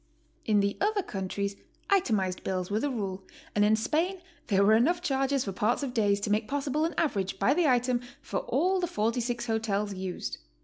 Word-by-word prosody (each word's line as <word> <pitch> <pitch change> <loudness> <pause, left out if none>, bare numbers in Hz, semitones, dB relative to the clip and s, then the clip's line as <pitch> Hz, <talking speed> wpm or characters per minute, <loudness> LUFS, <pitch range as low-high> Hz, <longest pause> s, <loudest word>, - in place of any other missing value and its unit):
In 210 -2 +3
the 200 0 0
other 410 0 +1
countries 200 - -3 0.4
itemized 215 - +1
bills 185 0 -2
were 210 - +1
the 290 - 0
rule, 195 -7 -3 0.3
and 205 - +3
in 210 +1 +5
Spain 325 - 0 0.3
there 200 -1 +3
were 215 - +6
enough 295 +11 +3
charges 270 -3 +1
for 195 - -2
parts 215 +8 0
of 260 -3 -3
days 205 -4 +2
to 205 - -1
make 215 +1 +1
possible 285 +2 0
an 330 - -3
average 200 - 0
by 220 +8 +3
the 345 0 +2
item 250 -1 +2 0.2
for - - -3
all 375 +1 +1
the 350 - 0
46 235 0 -1
hotels 210 -3 -1
used. 185 -1 -5
225 Hz, 190 wpm, -29 LUFS, 200-280 Hz, 0.4 s, were